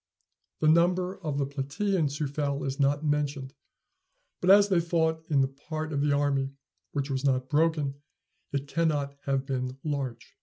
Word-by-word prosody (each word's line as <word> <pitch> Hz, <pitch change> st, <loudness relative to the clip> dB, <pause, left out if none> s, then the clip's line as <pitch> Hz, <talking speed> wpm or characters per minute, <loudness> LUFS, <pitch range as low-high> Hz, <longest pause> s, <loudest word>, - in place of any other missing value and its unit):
The 155 Hz, -, +3 dB
number 180 Hz, +3 st, +3 dB
of 150 Hz, -3 st, -2 dB
the 140 Hz, -, +1 dB
Platæans 145 Hz, +3 st, -1 dB
who 150 Hz, -, -1 dB
fell 140 Hz, 0 st, -2 dB
is 135 Hz, +1 st, -3 dB
not 145 Hz, +2 st, +2 dB
mentioned; 145 Hz, -2 st, -1 dB, 0.9 s
but, 180 Hz, -, 0 dB
as 200 Hz, +1 st, +8 dB
they 185 Hz, -3 st, +4 dB
fought 160 Hz, -1 st, 0 dB
in 145 Hz, -3 st, +3 dB
the 135 Hz, -, +3 dB
part 155 Hz, +3 st, -6 dB
of 140 Hz, -, 0 dB
the 145 Hz, 0 st, +2 dB
army 140 Hz, -1 st, +1 dB, 0.4 s
which 140 Hz, -1 st, -2 dB
was 135 Hz, 0 st, -1 dB
not 130 Hz, -1 st, +1 dB
broken, 150 Hz, -3 st, +1 dB, 0.5 s
it 140 Hz, 0 st, -2 dB
cannot 145 Hz, -3 st, 0 dB
have 135 Hz, -1 st, 0 dB
been 130 Hz, -1 st, -3 dB
large. 140 Hz, -5 st, -4 dB
145 Hz, 165 wpm, -28 LUFS, 140-160 Hz, 0.9 s, as